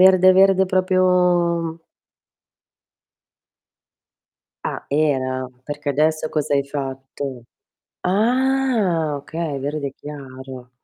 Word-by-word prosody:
verde, 185 0 +7
verde, 190 -1 +5
proprio 180 -3 +2 2.9
Ah, - - -4
era? 130 -3 0
Perché 145 +1 -5
adesso 155 +2 +1
cosa 150 -2 -1
hai 140 -1 +2
fatto? 135 -2 -6 0.6
Ah, 220 - +1
okay, 155 0 -4
verde 140 0 -3
chiaro. 130 -3 -9
155 Hz, 80 wpm, -21 LUFS, 140-185 Hz, 2.9 s, verde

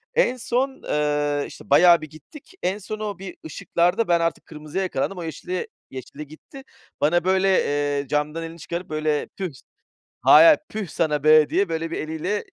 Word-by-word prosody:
En 255 - +2
son, 260 +3 -2
eee, 145 -1 0
işte, - - -13
bayağı 170 +3 +6
bir 155 - -8
gittik. 160 - -15
En 190 +3 0
son 215 +1 -7
o 210 -3 -4
bir 190 -2 -9
ışıklarda 175 +7 0
ben 170 -1 +3
artık 165 0 -2
kırmızıya 155 +4 -5
yakalandım. 185 +1 -2
O 175 - -5
yeşile 165 +3 -6
yeşille 180 - -3 0.5
geçti - - -15
gitti. 265 - -13 0.4
Bana 170 +3 +2
böyle, 190 +1 +2 0.5
eee, 140 - -11
camdan 150 +4 -2
elini 165 +1 -9
çıkarıp 170 +4 -6
böyle 155 -1 -1
tüh. 185 -4 -3 0.7
Hayır - - +8
hayır, 320 -2 +7
püh 215 -4 -5
sana 150 -2 -1
be 155 -1 +6
diye 195 -3 +1
böyle 165 0 -3
bir - - -3
eliyle 160 +6 -3
170 Hz, 180 wpm, -23 LUFS, 155-195 Hz, 0.7 s, Hayır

